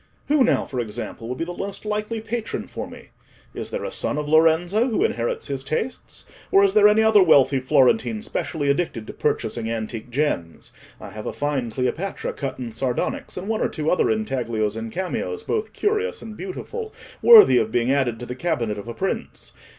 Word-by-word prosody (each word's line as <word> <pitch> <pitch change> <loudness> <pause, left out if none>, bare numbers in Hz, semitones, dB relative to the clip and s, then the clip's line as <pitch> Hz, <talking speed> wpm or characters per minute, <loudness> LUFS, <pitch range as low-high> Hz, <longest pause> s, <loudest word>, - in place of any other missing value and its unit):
Who 295 -2 +5
now, 245 - +2
for 130 - -5
example, 115 0 -5
would 125 - -4
be - - -2
the 175 - -6
most 200 +3 -6
likely 215 +1 -2
patron 225 0 -4
for - - -6
me? - - -13 0.4
Is - - -6
there - - -4
a - - -4
son 150 - -1
of 150 0 -3
Lorenzo 165 - +3
who 225 - +1
inherits 120 0 -2
his 135 -2 -3
tastes? 155 - -4 0.3
Or 195 - +6
is 195 -1 +3
there 210 -1 +7
any 215 +1 +4
other 220 -2 +6
wealthy 140 -6 +5
Florentine 215 - +2
specially 155 -9 -3
addicted 140 -8 -2
to - - -8
purchasing 115 -1 -1
antique 115 0 -4
gems? 120 - -2 0.3
I - - -9
have 105 0 -7
a - - -3
fine 145 -5 -1
Cleopatra 130 - -2
cut 135 -2 -4
in 120 -3 -5
sardonyx, 125 +8 -2
and 180 +2 -5
one 220 0 -1
or - - +1
two 155 -1 -1
other 180 - +2
intaglios 120 - -1
and 110 0 -5
cameos, 190 - -3
both 440 -1 -2
curious 430 +3 -1
and 220 -1 -8
beautiful, 435 - -6 0.3
worthy 430 - +9
of 110 -1 -1
being 120 +2 +1
added 130 -5 +1
to - - -4
the 125 - -5
cabinet 125 -8 -2
of 100 - -9
a 115 - -6
prince. 195 - -3
155 Hz, 195 wpm, -23 LUFS, -, 0.4 s, worthy